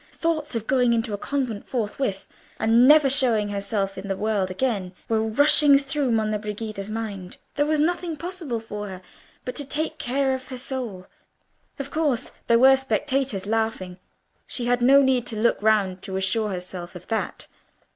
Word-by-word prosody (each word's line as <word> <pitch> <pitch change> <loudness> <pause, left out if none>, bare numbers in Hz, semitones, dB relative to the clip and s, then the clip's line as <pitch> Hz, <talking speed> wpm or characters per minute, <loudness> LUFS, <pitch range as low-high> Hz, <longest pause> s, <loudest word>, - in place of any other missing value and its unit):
Thoughts 310 -4 -2
of 225 -1 -2
going 250 -2 +3
into 225 -1 -1
a - - -2
convent 255 -7 -3
forthwith, 215 -3 -3 0.3
and 230 +3 +5
never 300 -1 +7
showing 245 -6 +4
herself 200 -1 -2
in 195 - -8
the 195 -1 -2
world 210 -3 0
again, 195 -3 -2
were 220 -1 +1
rushing 285 +5 +5
through 275 0 -1
Monna 215 -2 0
Brigida's 210 -1 -5
mind. 205 -5 -5 0.2
There 290 +1 0
was 310 0 +1
nothing 340 +1 0
possible 335 -7 -4
for 210 -2 -6
her 185 -1 -9 0.4
but 250 - -4
to 290 - -1
take 310 +3 -3
care 270 -1 0
of 260 0 -5
her 255 - -6
soul. 245 -8 -5 0.7
Of 275 -1 -6
course, 295 -7 0 0.2
there 230 - +5
were 265 +2 +7
spectators 265 -6 -1
laughing: 215 -4 -2 0.5
she 245 - -4
had 245 0 +1
no 275 +3 +6
need 260 -2 +1
to 220 - -3
look 235 -1 +2
round 200 -4 +2
to 190 -2 -4
assure 210 +3 0
herself 180 -1 -6
of 180 - -10
that. 225 - -2
230 Hz, 175 wpm, -24 LUFS, 205-275 Hz, 0.7 s, never